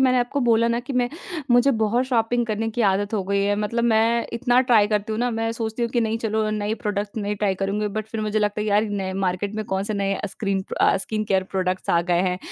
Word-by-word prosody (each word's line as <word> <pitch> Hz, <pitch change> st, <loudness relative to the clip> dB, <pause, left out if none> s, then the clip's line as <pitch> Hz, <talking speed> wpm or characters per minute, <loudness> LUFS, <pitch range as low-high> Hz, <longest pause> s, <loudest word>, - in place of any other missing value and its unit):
मैंने 255 Hz, -1 st, +4 dB
आपको 245 Hz, +4 st, -1 dB
बोला 230 Hz, -1 st, +3 dB
ना 235 Hz, +1 st, 0 dB
कि 260 Hz, +3 st, -7 dB
मैं 245 Hz, -1 st, +1 dB, 0.4 s
मुझे 245 Hz, +3 st, +5 dB
बहुत 225 Hz, +4 st, +1 dB
शॉपिंग 240 Hz, -1 st, +1 dB
करने 225 Hz, +1 st, -1 dB
की 240 Hz, -, -3 dB
आदत 205 Hz, +3 st, 0 dB
हो 200 Hz, -, 0 dB
गई 200 Hz, +1 st, 0 dB
है। 205 Hz, 0 st, +2 dB
मतलब 230 Hz, +3 st, -1 dB
मैं 230 Hz, +1 st, +2 dB
इतना 245 Hz, +1 st, +3 dB
ट्राई 215 Hz, -4 st, +5 dB
करती 210 Hz, 0 st, -1 dB
हूँ 215 Hz, -, -2 dB
ना 245 Hz, 0 st, +1 dB
मैं 225 Hz, 0 st, -1 dB
सोचती 225 Hz, 0 st, -3 dB
हूँ 235 Hz, -, 0 dB
कि 240 Hz, -, +1 dB
नहीं 225 Hz, 0 st, 0 dB
चलो 220 Hz, -1 st, -1 dB
नए 215 Hz, 0 st, -1 dB
प्रोडक्ट्स 205 Hz, 0 st, -3 dB
नहीं 205 Hz, +1 st, -1 dB
ट्राई 200 Hz, -2 st, 0 dB
करूँगी 200 Hz, +2 st, -1 dB
बट 215 Hz, +1 st, -4 dB
फिर 220 Hz, -1 st, -4 dB
मुझे 215 Hz, 0 st, 0 dB
लगता 210 Hz, 0 st, 0 dB
है 215 Hz, -, -2 dB
यार 210 Hz, +1 st, +3 dB
नए 195 Hz, -2 st, -3 dB
मार्केट 195 Hz, +2 st, -2 dB
में 215 Hz, 0 st, -3 dB
कौन 190 Hz, 0 st, -2 dB
से 215 Hz, -, -3 dB
नए 195 Hz, 0 st, -1 dB
स्क्रीन 195 Hz, -2 st, -2 dB, 0.2 s
अ, -, -, +4 dB
स्किन 215 Hz, +2 st, -2 dB
केयर 190 Hz, -2 st, +1 dB
प्रोडक्ट्स 185 Hz, -1 st, -1 dB
आ 170 Hz, -, +4 dB
गए 175 Hz, 0 st, +3 dB
हैं। 180 Hz, -1 st, 0 dB
215 Hz, 255 wpm, -23 LUFS, 200-235 Hz, 0.4 s, मुझे